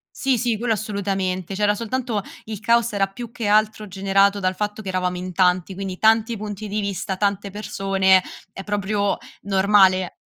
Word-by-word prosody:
Sì, 265 -3 +1
sì, 235 -3 0
quello 230 0 0
assolutamente. 195 -3 -2
C'era 205 +1 +2
soltanto 230 -2 -2 0.2
il 215 -2 -6
caos 235 0 +2
era 195 -1 +2
più 230 +4 -9
che 230 -2 -5
altro 215 0 +2
generato 195 +1 +2
dal 185 -1 0
fatto 210 +2 -3
che 195 - -11
eravamo 180 -1 -1
in 185 0 -5
tanti, 180 +1 +2
quindi 190 -1 -5
tanti 225 +1 +3
punti 210 0 -6
di 210 +1 -2
vista, 190 -1 -3
tante 200 -1 -1
persone, 195 -2 +2 0.3
è 195 - -8
proprio 205 0 -1 0.2
normale. 190 -2 +3
200 Hz, 170 wpm, -22 LUFS, 190-215 Hz, 0.3 s, tanti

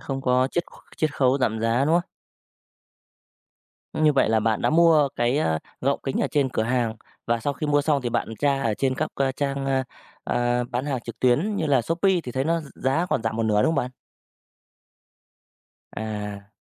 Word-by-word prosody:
Không 135 -1 -4
có 130 0 +2
chiết 175 - -1 0.3
chiết 155 -2 0
khấu 130 0 +3
giảm 110 -3 0
giá, 115 +4 +2
đúng 160 +3 +2
không? - - -15 1.9
Như 155 -1 +3
vậy 135 - +3
là 110 0 +3
bạn 110 0 0
đã - - +2
mua 160 -3 +5
cái, 120 +4 +1
a, 80 - +1 0.2
gọng 140 +2 0
kính 135 - -2
ở - - +2
trên 140 -3 +2
cửa 115 - -1
hàng, 120 -1 0 0.3
và 115 0 +1
sau 145 +5 -1
khi 150 +3 -4
mua 145 0 +2
xong 145 -2 +1
thì 120 - -1
bạn 115 - -1
tra 140 -1 +1
ở 115 -4 0
trên 130 +3 0
các 155 +4 -1
c 135 -1 -1
trang, 140 -1 -2
a, 135 -1 +1 0.4
à, 120 0 0
bán 125 +3 -2
hàng 135 -4 -2
trực 115 0 -9
tuyến 150 - +2
như 155 - -1
là 135 -4 +3
Shopee 175 - +1
thì 125 - -7
thấy 130 +1 -1
nó 165 +1 +1
gi 150 - -11
giá 155 +7 0
còn - - +1
giảm 110 0 -2
một 115 - 0
nửa, 105 -1 +2
đúng - - +3
không - - -1
bạn? 125 - -1 2.0
À. 105 -2 -5
130 Hz, 210 wpm, -24 LUFS, 115-145 Hz, 2.0 s, mua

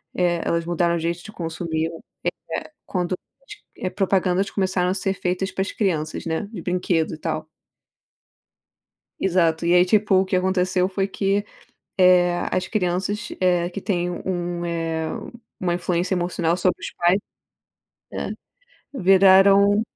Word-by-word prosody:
eh, 175 -2 +1
elas 170 0 0
mudaram 170 0 +1
o - - -1
jeito 170 +1 -2
de 215 - -10
consumir. 165 -2 -3 0.8
É - - -15
quando 180 -1 -1 0.6
é 185 - -2
propagandas 190 -1 +1
começaram 185 -2 0
a 185 - +1
ser 195 0 -1
feitas 185 +1 -2
para 190 - -3
as 195 - -2
crianças, 160 -7 -1
né. 165 +5 -2
De 195 -7 -7
brinquedo 180 -2 0
e - - -6
tal. 155 0 -3 1.7
Exato. 170 -3 +2
E 170 - +3
aí, 180 0 +6
tipo 210 +1 +3
o 190 +1 +4
que 185 0 -1
aconteceu 185 0 +1
foi 195 0 -1
que, 200 +1 0 0.5
eh, 180 -1 +5 0.2
as 185 - 0
crianças, 200 +3 -1
eh, 180 -1 +2
que 200 - -6
têm 180 -3 -1
um 175 -1 -3
um, - - -3
eh, 165 -1 -2 0.5
uma 175 -2 0
influência 180 +1 0
emocional 175 -1 0
sobre 180 0 0
os - - -5
pais. 175 +3 +3 0.9
Né, - - -4 0.6
viraram 195 0 +6
180 Hz, 145 wpm, -23 LUFS, 175-190 Hz, 1.7 s, aí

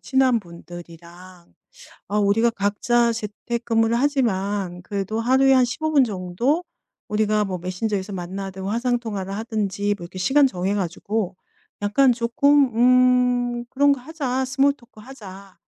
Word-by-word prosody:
친한 265 -2 +2
분들이랑 175 0 -13 0.6
"아 205 - -2
우리가 210 +3 +3
각자 230 +3 +1
재택 230 +2 -5
근무를 225 0 +2
하지만 205 -9 -1
그래도 200 +3 -3
하루에 265 +3 +4
한 255 -1 +5
15 315 +6 -3
분 285 -3 +5
정도 220 - -1 0.4
우리가 210 0 +1
뭐 185 -2 -4
메신저에서 190 +3 -3
만나든 190 +1 -6
화상 235 +5 0
통화를 200 -5 -5
하든지 205 -2 -2
뭐 175 - -10
이렇게 175 +2 -9
시간 275 +10 +4
정해 190 -4 -2
가지고 195 +1 -3 0.5
약간 230 +6 +3
쪼끔 250 +2 +2 0.8
음 240 - -7
그런 285 +3 +3
거 280 - 0
하자. 265 -3 -3
스몰 275 +2 +2
토크 235 -5 -20
하자." 200 -6 -12
215 Hz, 295 characters per minute, -22 LUFS, 190-250 Hz, 0.8 s, 한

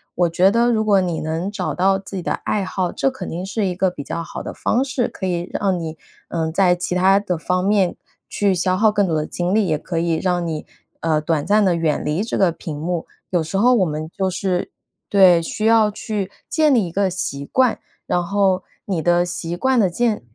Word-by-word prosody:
我 175 0 +3
觉 185 +4 +4
得 235 +2 +3
如 220 - +1
果 205 -2 +4
你 175 -3 -1
能 160 +5 -2
找 200 -3 -3
到 190 +2 +2
自 195 0 -8
己 - - -3
的 - - -1
爱 205 -2 -2
好， 185 -1 -2
这 270 - 0
肯 260 0 -7
定 175 +3 -4
是 205 +2 -1
一 185 - -1
个 185 +1 +2
比 150 -5 -8
较 170 - -4
好 - - -7
的 - - -5
的 - - -11
方 250 - 0
式， 265 -3 -1
可 - - -6
以 175 -1 -2
让 190 -3 0
你， 160 -1 -5 0.3
呃， 160 -1 -2
在 180 +1 +3
其 180 0 -3
他 190 +2 +4
的 185 -4 -1
方 180 +2 -1
面 195 -2 +2 0.3
去 200 -2 +1
消 185 +1 +1
耗 215 +3 +4
更 205 -2 +1
多 165 - 0
的 155 -1 0
精 180 +5 -2
力， 220 - +3
也 155 - +1
可 165 +2 -3
以 170 -1 +1
让 175 +1 0
你， 160 -2 -4 0.3
呃， 155 -2 +1
短 155 -1 -1
暂 210 +3 +3
地 185 -3 +3
远 160 -3 0
离 155 +7 -1
这 - - -2
个 190 -3 +3
屏 160 -2 -7
幕。 170 +2 -3 0.2
有 175 -2 +1
时 160 +4 -3
候 245 +5 +5
我 200 -6 +3
们 155 -1 -4
就 190 -1 0
是 185 -1 -2 0.4
对， 185 -4 +6
需 215 +6 -3
要 225 -1 +5
去 205 -2 -4 0.2
建 305 -3 +3
立 220 -5 +3
一 - - -8
个 195 +2 +1
习 175 -6 -4
惯， 255 -3 +2 0.3
然 175 - 0
后 190 -1 +1 0.2
你 185 -5 -1
的 175 +1 +3
习 175 -1 -4
惯 260 +3 +2
的 195 - +3
建 220 +4 0
185 Hz, 255 characters per minute, -20 LUFS, 170-205 Hz, 0.4 s, 对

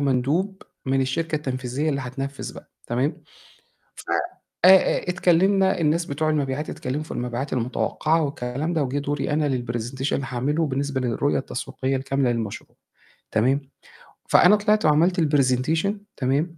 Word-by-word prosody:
مندوب 145 +9 0 0.2
من 135 0 +2
الشركة 155 +5 -1
التنفيذية 130 +1 -2
اللي 140 -1 -1
هتنفِّذ 135 +2 -5
بقى - - -13 0.2
تمام، 125 +5 -1 0.7
ف - - -10 0.6
آآ 185 - +9
آآ، 190 -1 +5
اتكلِّمنا 190 +2 +3
الناس 165 +2 +2
بتوع 155 +2 -1
المبيعات 145 -1 -1
اتكلِّموا 140 +4 -3
في - - -10
المبيعات 125 +3 -3
المتوقّعة 150 +6 0
والكلام 140 +4 -3
ده 160 - +1
وجِه 135 +1 -2
دوري 145 +1 -2
أنا 150 -1 +1 0.2
للpresentation 120 +4 -2
هاعمله 135 +6 -1
بالنسبة 135 0 -2
للرؤية 125 +4 0
التسويقية 135 0 -3
الكاملة 135 -1 0
للمشروع 110 -4 -5 0.6
تمام، 130 +6 +2 0.7
فأنا 210 - +7
طلعت 210 -1 +2
وعملت 170 +4 +3
الpresentation 145 +4 +2 0.3
تمام، 145 +6 0
140 Hz, 135 wpm, -24 LUFS, 130-160 Hz, 0.7 s, آآ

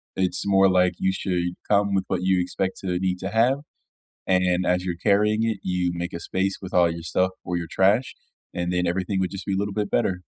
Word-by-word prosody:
It's 95 -1 0
more 95 -1 +5
like 90 -1 +3
you 95 - +2
should 90 -2 -2
come 100 -1 +2
with 95 -1 +1
what 90 -1 -2
you 95 -1 +3
expect 95 +1 -2
to 90 -2 -2
need 90 -1 -1
to 95 - -4
have, 120 +6 +2 0.7
and 90 -1 +2
as 90 0 +1
you're 90 -2 -2
carrying 105 +4 +2
it, 115 -2 0
you 90 -1 0
make 85 0 -4
a 85 - -4
space 95 +2 -1
with 95 -2 -8
all 90 -1 +5
your 85 0 -6
stuff 90 +2 +1
or 90 0 -2
your 85 -1 -4
trash, 100 +9 +2 0.4
and 85 0 -2
then 90 0 +1
everything 95 +2 -1
would 95 -1 0
just 95 -1 -6
be 100 - -1
a - - 0
little 100 0 -2
bit 105 -1 -2
better. 90 -2 0
95 Hz, 230 wpm, -24 LUFS, 90-100 Hz, 0.7 s, more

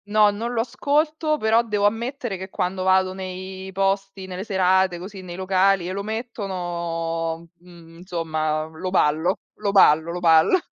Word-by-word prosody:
No, 210 0 +4
non 225 +4 -4
lo 230 - +1
ascolto 300 +5 0
però 220 -2 +3
devo 210 -3 0
ammettere 235 +1 -1
che 190 +1 -7
quando 185 -1 -2
vado 185 0 +3
nei 190 0 -7
posti, 195 0 -1
nelle 185 0 -6
serate 190 -3 +2
così 190 +2 -9
nei 175 -2 -8
locali 190 0 +2
e - - -3
lo 195 +1 -3
mettono, 170 -7 -4
mhmm, 170 -2 -16
insomma 160 -3 -2
lo 160 +4 -6
ballo 175 +2 +1 0.2
lo 205 - 0
ballo 165 -4 +5
lo 175 - -4
ballo. 165 - +5
190 Hz, 155 wpm, -23 LUFS, 175-205 Hz, 0.2 s, ballo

